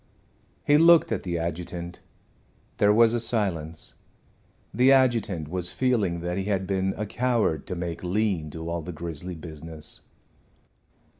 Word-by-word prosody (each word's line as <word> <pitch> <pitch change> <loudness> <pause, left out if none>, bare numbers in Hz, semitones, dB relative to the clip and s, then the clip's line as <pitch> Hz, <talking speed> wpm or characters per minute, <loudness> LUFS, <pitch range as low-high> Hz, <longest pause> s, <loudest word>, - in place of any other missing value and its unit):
He 145 +1 +5
looked 165 0 +6
at - - -1
the 85 -2 -3
adjutant. 85 +1 -5 0.8
There 105 - +4
was 115 +1 +5
a 120 - +1
silence. 90 -9 -1 0.8
The 130 +2 +5
adjutant 115 - +2
was 90 +2 -2
feeling 105 -10 0
that 90 +2 -2
he 95 - -3
had 95 -2 0
been 95 0 -1
a 105 - -2
coward 115 - 0
to 90 - -3
make 85 -1 -5
Lean 90 -4 0
do 80 +2 -7
all 85 0 -2
the 90 +3 -7
grisly 85 +2 -6
business. 80 -1 -8
90 Hz, 145 wpm, -26 LUFS, 85-110 Hz, 0.8 s, looked